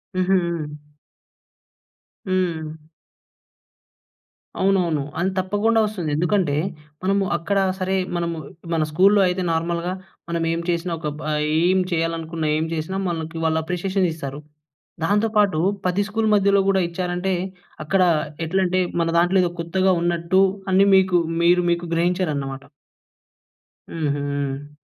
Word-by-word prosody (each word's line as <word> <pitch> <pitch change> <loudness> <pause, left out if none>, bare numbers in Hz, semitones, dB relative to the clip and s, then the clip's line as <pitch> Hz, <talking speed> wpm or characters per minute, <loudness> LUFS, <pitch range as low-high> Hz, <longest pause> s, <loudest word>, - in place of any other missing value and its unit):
హుహు. 170 -5 -1 1.3
హ్మ్. 160 -4 -2 1.7
అవునవును. 180 -6 +2 0.2
అ‌న్ 180 +2 +1
తప్పకుండా 205 +4 +1
వస్తుంది. 195 -7 -3
ఎందుకంటే 175 -1 +1 0.5
మనము 195 +1 +2
అక్కడ 195 +4 0 0.2
సరే 190 +1 0 0.2
మనము 170 -1 -2 0.4
మన 160 -1 +2
స్కూల్‌లో 195 +6 +5
అయితే 180 +1 -1
నార్మల్‍గా 170 +2 -1 0.4
మనం 170 -1 -1
ఏం 165 - -1
చేసినా 170 +1 -1
ఒక 155 - -4
బ - - -8 0.4
ఏం 185 +2 +3
చేయాలనుకున్న, 165 -1 -2
ఏం 160 - 0
చేసినా 165 +4 -3
మనకి 165 -1 -4
వాళ్ళు 160 0 +2
అప్రిషియేషన్ 185 +3 0
ఇస్తారు. 140 -3 -6 0.6
దాంతో 205 +5 +2
పాటు 200 -6 +3 0.3
10 180 +2 +1
స్కూల్ 220 +1 -1
మధ్యలో 200 0 +4
గూడా 195 -1 +3
ఇచ్చారంటే 180 +2 -2 0.5
అక్కడ 185 +5 +1 0.4
ఎట్లంటే, 185 +2 +1 0.2
మన 165 - +1
దాంట్లో 175 +3 +3
ఏదో 175 - 0
కొత్తగా 185 +3 +1
ఉన్నట్టు 175 +2 +2 0.3
అన్ని 195 +2 +5
మీకు 185 -1 +4 0.2
మీరు 175 +1 +4
మీకు 170 0 -1
గ్రహించారన్నమాట. 155 -6 -1 1.3
హుహు. 145 -2 -3
175 Hz, 115 wpm, -22 LUFS, 160-190 Hz, 1.7 s, స్కూల్‌లో